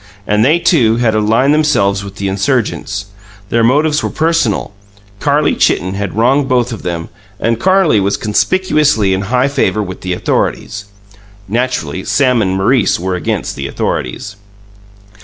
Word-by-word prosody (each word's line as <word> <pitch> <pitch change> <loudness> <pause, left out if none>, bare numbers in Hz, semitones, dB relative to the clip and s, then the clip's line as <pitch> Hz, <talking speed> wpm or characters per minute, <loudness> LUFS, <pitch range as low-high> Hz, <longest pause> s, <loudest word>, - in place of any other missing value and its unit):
And 105 +1 +2
they, 150 +7 +4
too, 150 -10 +2
had 115 -2 +1
aligned 110 +6 +2
themselves 100 -11 +1
with 100 0 -9
the 100 0 -3
insurgents. 100 -1 -1 0.4
Their 115 0 +1
motives 150 +5 +2
were - - -2
personal 160 -11 0 0.5
Carlie - - +1
Chitten 95 +1 +1
had 100 -1 -4
wronged 135 +4 +2
both 125 -2 +1
of 110 - -7
them, 85 -2 -4 0.3
and 115 0 0
Carlie 185 - +3
was 100 +1 0
conspicuously 150 - +1
in 95 - -1
high 125 +6 +1
favour 135 -6 0
with 95 -1 -8
the 90 -1 -2
Authorities. 100 +3 -2 0.6
Naturally 100 - -2
Sam 125 -4 +2
and 95 -2 0
Maurice 110 +2 +2
were 95 +1 -2
against 85 -4 -3
the 70 0 -4
Authorities. 95 +11 -4
110 Hz, 150 wpm, -14 LUFS, 100-135 Hz, 0.6 s, they